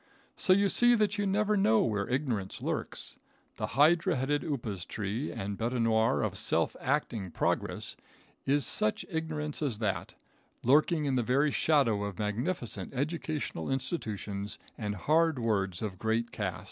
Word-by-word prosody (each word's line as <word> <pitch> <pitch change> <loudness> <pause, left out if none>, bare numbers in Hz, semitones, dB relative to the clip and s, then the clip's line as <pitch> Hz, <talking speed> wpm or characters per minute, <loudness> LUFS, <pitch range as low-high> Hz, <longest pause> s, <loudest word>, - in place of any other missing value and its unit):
So - - +2
you 200 +2 +5
see 240 +5 +5
that 210 -2 +1
you 205 - +1
never 210 +2 +2
know 110 - +4
where 100 -3 -1
ignorance 125 -7 -1
lurks. - - -3 0.4
The - - -2
hydra 170 +5 +5
headed 135 +3 0
upas 115 - -3
tree 105 +7 -3
and 100 0 -4
bete 115 +2 -1
noir 115 +2 +3
of 95 -3 -1
self - - +1
acting 125 -8 -1
progress, - - -1 0.5
is 140 -1 +2
such 105 -1 +1
ignorance 155 -2 -3
as 135 -8 0
that, 105 -3 -2 0.5
lurking 150 +4 +4
in 135 -2 +1
the - - +3
very 135 +6 +2
shadow 135 -11 +3
of 100 -3 -4
magnificent 110 - -3
educational 150 - -2
institutions 105 - -3 0.2
and 105 -2 -3
hard 160 - +2
words 100 -5 0
of 95 -4 -4
great 115 +1 0
cast. - - -3
125 Hz, 150 wpm, -30 LUFS, 105-155 Hz, 0.5 s, you